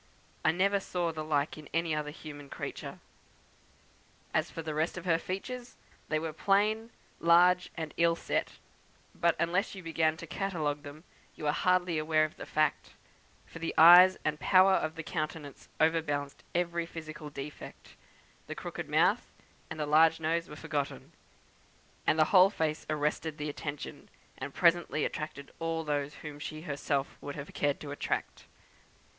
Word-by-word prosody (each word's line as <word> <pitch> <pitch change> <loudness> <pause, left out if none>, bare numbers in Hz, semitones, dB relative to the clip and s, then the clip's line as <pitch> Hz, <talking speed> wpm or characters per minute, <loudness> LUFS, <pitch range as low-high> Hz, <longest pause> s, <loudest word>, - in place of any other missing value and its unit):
I 155 - +5
never 195 +4 +2
saw 175 -3 -2
the 155 -1 -5
like 150 0 0
in 150 - -12
any 165 -1 +1
other 150 -1 -2
human 145 -2 -10
creature. - - -6 1.4
As - - +1
for 165 - -6
the 155 -1 -4
rest 160 +4 -1
of 180 - -7
her 165 -2 +3
features, 240 +8 -6 0.3
they 155 - +1
were 160 0 -3
plain, 210 +6 +2 0.3
large, 180 +2 +5
and 160 -2 -4
ill 170 0 +4
set; - - -2 0.6
but, 170 0 +2
unless 180 +5 0
you 190 - -9
began 160 -1 +1
to 165 - -8
catalogue 155 -5 -2
them, 145 +2 -11 0.3
you - - -10
were 150 - +2
hardly 180 0 +2
aware 155 0 +3
of 155 - -9
the - - -8
fact, 155 -1 0 0.5
for 165 - -11
the 165 - -3
eyes 180 +3 +9
and 150 -1 0
power 190 +4 +5
of 155 -3 0
the 165 - -5
countenance 155 -2 -5
over 160 +1 +4
balanced 145 -2 -4
every 170 -1 0
physical 155 -2 -8
defect; 145 +1 -9 0.6
the - - -5
crooked - - -6
mouth - - +2 0.4
and - - -6
the 150 - 0
large 160 +2 +5
nose 165 +1 -1
were 150 - -8
forgotten, 145 -1 -4 1.0
and - - +4
the 155 - +5
whole 185 0 +8
face 160 -5 -2
arrested 150 +1 -1
the 150 0 -3
attention, 145 0 -6 0.3
and 140 - -6
presently 170 -3 +3
attracted 145 -2 -5
all 165 0 -2
those 145 -1 -2
whom 150 -1 -7
she 155 +1 -6
herself 140 -3 -2
would 145 - -6
have 140 0 -8
cared 145 -1 0
to 145 - -7
attract. 145 - -3
160 Hz, 165 wpm, -30 LUFS, 150-170 Hz, 1.4 s, eyes